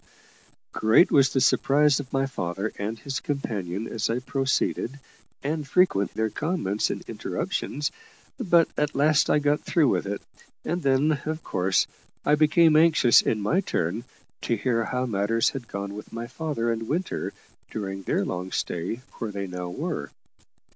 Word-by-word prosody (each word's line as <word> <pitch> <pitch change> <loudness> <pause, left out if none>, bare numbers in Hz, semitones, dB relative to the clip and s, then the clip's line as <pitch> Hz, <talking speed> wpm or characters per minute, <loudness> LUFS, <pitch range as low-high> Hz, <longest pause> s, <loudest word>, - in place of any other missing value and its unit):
Great 110 - +4
was 135 -1 +5
the 135 - +2
surprise 140 +3 +4
of 130 -3 -7
my 135 0 +1
father 95 -4 -3
and 105 +3 -3
his 135 +4 -4
companion 105 -8 -3
as 110 - -2
I 115 - +1
proceeded, 135 0 -1 0.4
and 150 0 -2
frequent 135 - +2
their 110 -1 0
comments 150 - -1
and - - -4
interruptions; 145 +2 -3 0.5
but 170 -8 +4
at 150 0 -1
last 150 +2 +3
I - - +4
got 145 0 +2
through 155 -6 +2
with 95 -1 0
it, 100 0 -4 0.4
and 175 +2 -1
then, 140 +2 +2
of 155 +1 -3
course, 95 0 +1 0.4
I 145 - +4
became 155 +1 +5
anxious, 155 -6 +6
in 110 - 0
my 150 - +2
turn, 90 - -2 0.4
to 120 - 0
hear 115 0 0
how 125 +3 -1
matters 110 0 +1
had 130 -4 -7
gone 100 0 -5
with 105 - -9
my 115 +1 -5
father 125 -4 -2
and 115 -1 -3
Winter 170 +7 -2 0.4
during 95 -2 -4
their 95 - 0
long 90 +1 -4
stay 90 +8 -3 0.2
where 115 - -2
they 100 -1 -4
now 90 -1 -5
were. 90 - -4
125 Hz, 160 wpm, -26 LUFS, 100-150 Hz, 0.5 s, anxious